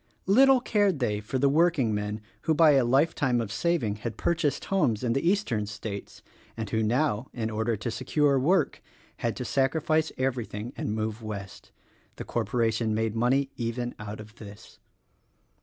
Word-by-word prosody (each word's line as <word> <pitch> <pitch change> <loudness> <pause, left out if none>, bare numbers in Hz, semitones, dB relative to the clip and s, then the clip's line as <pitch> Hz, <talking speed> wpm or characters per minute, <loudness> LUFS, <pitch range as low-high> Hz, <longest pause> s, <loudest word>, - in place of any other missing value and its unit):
Little 260 +7 +6
cared 205 - +2
they 105 -6 -1
for 105 +5 -3
the 140 +2 +3
workingmen 120 -10 +1 0.2
who 160 - +2
by 160 -1 +6
a 135 -3 +4
life 135 +7 +3
time 125 -4 +1
of 110 -4 -3
saving 135 -8 0
had 110 0 -5
purchased 165 -4 0
homes 125 - +1
in 120 -2 +1
the 135 +6 +1
eastern 130 - 0
states, 100 0 -7 0.3
and 110 -1 -3
who 110 - +1
now, 120 +1 +1
in 110 -2 -3
order 110 +1 0
to 115 +3 -4
secure 140 +2 +1
work 175 +9 +1 0.4
had 115 -1 -2
to 125 - -5
sacrifice 155 +5 +1
everything 120 -3 -3
and 105 - -3
move 110 +1 -3
West. 100 -3 -8 0.4
The - - -7
corporation 115 -2 0
made 110 0 -1
money 135 +4 +1
even 120 +1 -3
out 105 0 -7
of 105 0 -11
this. 100 -2 -12
120 Hz, 165 wpm, -27 LUFS, 110-145 Hz, 0.4 s, Little